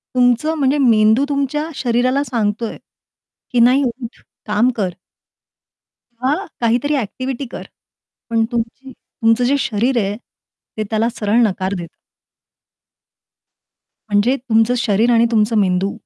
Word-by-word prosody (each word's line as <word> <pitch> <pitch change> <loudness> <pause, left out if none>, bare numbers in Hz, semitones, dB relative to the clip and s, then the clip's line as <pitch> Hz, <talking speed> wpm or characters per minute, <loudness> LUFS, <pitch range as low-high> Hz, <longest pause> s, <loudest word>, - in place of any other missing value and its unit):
तुमचं 250 +5 +2
म्हणजे 275 0 +2
मेंदू 225 -1 +4
तुमच्या 285 +2 -1
शरीराला 255 +3 +1
सांगतोय 225 -3 -2 0.7
की 245 - +1
नाही 255 +4 +5 0.2
उठ 235 - -9 0.3
काम 210 +4 +2
कर. 195 -4 0 1.3
हां, 275 +3 +2 0.3
काहीतरी 245 +6 +1
एक्टिव्हिटी 255 +5 -5
कर. - - -6 0.7
पण 225 -1 +2
तुमची 240 +3 -4
तुमचं 225 +1 0
जे 275 +3 +2
शरीर 240 +1 0
आहे 200 +1 -3 0.6
ते 215 - -2
त्याला 220 +1 +1
सरळ 215 +3 +1
नकार 190 0 -3
देतं. 170 -1 -8 2.2
म्हणजे 205 +6 +2
तुमचं 235 -1 +1
शरीर 225 0 +2
आणि 230 0 +4
तुमचं 220 0 +2
मेंदू 190 0 +1
235 Hz, 120 wpm, -18 LUFS, 215-260 Hz, 2.2 s, नाही